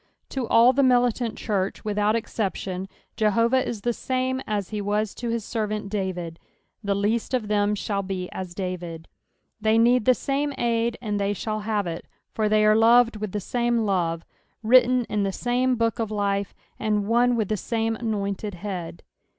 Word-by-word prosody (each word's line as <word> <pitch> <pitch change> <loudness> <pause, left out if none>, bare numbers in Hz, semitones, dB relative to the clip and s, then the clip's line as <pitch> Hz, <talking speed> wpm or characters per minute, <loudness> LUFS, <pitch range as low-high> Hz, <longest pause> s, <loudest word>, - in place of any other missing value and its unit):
To 260 -4 -3
all 235 +3 +6
the 280 - +2
militant 245 -3 +2
church, 200 -3 -2
without 210 +1 +1
exception, 195 -4 -3 0.3
Jehovah 230 +4 +2
is 220 -4 -5
the 240 +3 0
same 260 +1 -1
aa 210 -1 0
he 210 +2 -5
was 210 +1 -1
to 240 - -5
his 230 -2 -2
servant 215 -2 -3
David, 180 -5 -3 0.2
" - - -48
the 200 -1 0
least 220 +5 0
of 250 - 0
tbem 210 0 +1
shall 200 -1 -2
bo 190 -1 -4
as 185 -2 -6
David." 175 -4 -5 0.5
They 220 +1 +3
need 240 0 +4
the 255 - +5
same 285 +2 -1
ud 235 0 0
and 210 -2 -1
they 200 0 0
shall 215 +1 -3
have 210 -1 -1
it, 170 -1 -5 0.3
for 215 -1 0
they 215 0 +4
are 215 0 +5
loved 230 +1 +5
with 210 -2 -4
the 210 - -2
same 235 +2 0
love, 170 -4 0 0.4
written 250 +2 +5
in 210 -1 -1
the 195 -1 0
same 250 +4 0
book 230 0 0
of 225 -2 -1
life, 200 -1 -1 0.2
and 210 -1 0
one 240 +3 +3
with 220 -4 -1
the 215 - +1
same 225 +1 -1
anointed 205 -3 -3
Head. 180 -3 -6
215 Hz, 185 wpm, -25 LUFS, 200-235 Hz, 0.5 s, all